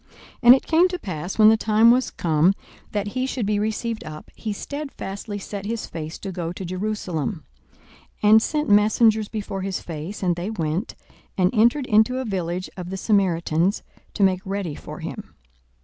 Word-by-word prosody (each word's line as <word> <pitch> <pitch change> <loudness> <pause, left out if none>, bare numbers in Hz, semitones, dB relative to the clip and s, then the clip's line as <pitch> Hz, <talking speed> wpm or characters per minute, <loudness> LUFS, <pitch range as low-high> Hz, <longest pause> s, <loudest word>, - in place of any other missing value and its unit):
42:009:051 - - -34 0.3
And 245 +1 +9
it 265 - -3
came 330 +3 +4
to 360 0 -4
pass, 180 - -5
when 215 -1 +8
the 220 - +5
time 220 +1 +5
was 255 +1 +2
come 165 +3 +2 0.4
that 205 -1 -2
he 255 +4 -2
should 255 -4 -2
be 205 0 +1
received 220 +1 -2
up, 155 -1 -10
he 220 - -5
stedfastly 210 -5 -6
set 200 0 -6
his 230 0 -3
face 160 0 -6
to 195 - -6
go 170 -2 -4
to 185 +1 -7
Jerusalem, 185 -2 -3 0.8
42:009:052 210 - +5
And 220 0 +8
sent 300 +5 -1
messengers 215 +1 +4
before 200 -3 -5
his 190 0 -2
face: 170 +5 -7
and 175 -2 +2
they 175 +4 -4
went, 170 0 -3 0.4
and 185 +2 +2
entered 240 +5 +3
into 220 +3 +3
a 260 - -2
village 180 -3 -3
of 180 -1 -7
the 190 - -4
Samaritans, 185 -3 +1 0.3
to 205 - +1
make 185 -1 +3
ready 195 -4 -3
for - - -9
him. - - -7
205 Hz, 185 wpm, -23 LUFS, 180-220 Hz, 0.8 s, And